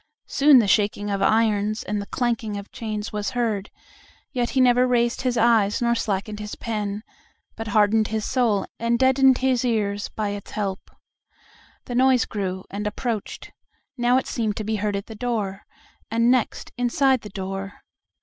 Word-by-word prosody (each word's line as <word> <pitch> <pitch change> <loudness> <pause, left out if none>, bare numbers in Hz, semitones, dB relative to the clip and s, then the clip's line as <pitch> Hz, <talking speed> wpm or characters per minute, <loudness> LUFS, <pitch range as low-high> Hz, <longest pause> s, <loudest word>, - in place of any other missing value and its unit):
Soon 280 0 +5
the 225 -4 +4
shaking 205 0 +1
of 200 -1 -1
irons 215 -1 +2
and 210 -1 -2
the 200 - -8
clanking 230 -4 -1
of 200 0 -9
chains 215 -2 -5
was 210 -1 -2
heard, 215 -4 -1 0.6
yet 245 -4 -1
he 265 - 0
never 250 0 +5
raised 240 -1 +1
his 250 -2 0
eyes 225 -3 +3
nor 235 -1 +2
slackened 210 -2 -2
his 210 0 -6
pen, 210 -2 -4 0.5
but 225 0 -6
hardened 215 +1 +3
his 220 -1 -2
soul 235 -6 +1
and 235 +1 +1
deadened 265 0 +4
his 260 -2 +1
ears 205 -4 -1
by 215 -2 -3
its 200 -1 -6
help. 195 -3 -3 1.0
The 245 - -6
noise 255 0 +4
grew 190 -3 -4
and 210 +1 -3
approached: 220 0 -4 0.4
now 245 0 +3
it 260 - 0
seemed 220 -4 -2
to 215 - -2
be 215 +1 -1
heard 205 0 -1
at 200 - -4
the 225 - -9
door, 210 -4 -3 0.4
and 230 +2 +3
next 255 -3 0
inside 260 +1 +2
the 210 - -9
door. 195 0 -6
220 Hz, 170 wpm, -23 LUFS, 205-245 Hz, 1.0 s, Soon